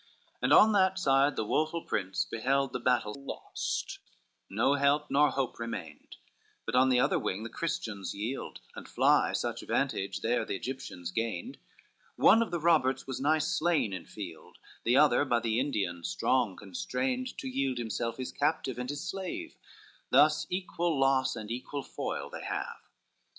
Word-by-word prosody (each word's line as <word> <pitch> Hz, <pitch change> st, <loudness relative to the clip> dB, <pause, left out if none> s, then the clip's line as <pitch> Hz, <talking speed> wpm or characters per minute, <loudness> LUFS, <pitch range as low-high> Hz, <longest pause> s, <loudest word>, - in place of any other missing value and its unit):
LXXI -, -, -32 dB
And -, -, +3 dB
on 220 Hz, -, +8 dB
that 190 Hz, -2 st, +3 dB
side 140 Hz, -4 st, +3 dB
the 110 Hz, -, -1 dB
woful 155 Hz, +8 st, 0 dB
prince 95 Hz, -1 st, -1 dB
beheld 135 Hz, +4 st, 0 dB
The -, -, -2 dB
battle 120 Hz, -4 st, +1 dB
lost, 140 Hz, 0 st, -4 dB, 0.5 s
no 115 Hz, +7 st, +2 dB
help 145 Hz, +1 st, +2 dB
nor 145 Hz, +2 st, +5 dB
hope 135 Hz, -4 st, -2 dB
remained; 90 Hz, -10 st, -7 dB, 0.5 s
But -, -, -4 dB
on 130 Hz, +1 st, +5 dB
the 125 Hz, -1 st, +4 dB
other -, -, +2 dB
wing 100 Hz, +4 st, -3 dB
the 115 Hz, -, -5 dB
Christians 105 Hz, -, -3 dB
yield, 115 Hz, +7 st, -5 dB
And -, -, -9 dB
fly, -, -, +3 dB
such -, -, -2 dB
vantage 95 Hz, 0 st, -1 dB
there 115 Hz, 0 st, +1 dB
the 110 Hz, -, -3 dB
Egyptians 95 Hz, -7 st, -6 dB
gained, 115 Hz, -, -3 dB, 0.6 s
One 225 Hz, -, +6 dB
of 230 Hz, -, 0 dB
the 175 Hz, -1 st, -2 dB
Roberts 150 Hz, -6 st, +2 dB
was 130 Hz, -1 st, -5 dB
nigh 155 Hz, +3 st, +3 dB
slain 155 Hz, -, +1 dB
in 90 Hz, -2 st, -6 dB
field; 85 Hz, -7 st, -9 dB, 0.3 s
The 120 Hz, +3 st, +4 dB
other 150 Hz, 0 st, +5 dB
by 120 Hz, -4 st, +2 dB
the 115 Hz, 0 st, 0 dB
Indian 100 Hz, -11 st, -2 dB
strong 120 Hz, +1 st, +1 dB
constrained 255 Hz, -, -3 dB
To 265 Hz, -, -5 dB
yield 135 Hz, -, -1 dB
himself 115 Hz, 0 st, -3 dB
his 130 Hz, -1 st, -4 dB
captive 140 Hz, -4 st, -1 dB
and 125 Hz, 0 st, -4 dB
his 145 Hz, +2 st, -4 dB
slave; 190 Hz, -2 st, -5 dB, 0.5 s
Thus 150 Hz, +3 st, +4 dB
equal 175 Hz, -4 st, -1 dB
loss 135 Hz, -1 st, +3 dB
and 110 Hz, -1 st, -7 dB
equal 130 Hz, +3 st, -4 dB
foil -, -, -5 dB
they -, -, -7 dB
have. -, -, -4 dB
130 Hz, 165 wpm, -30 LUFS, 115-150 Hz, 0.6 s, on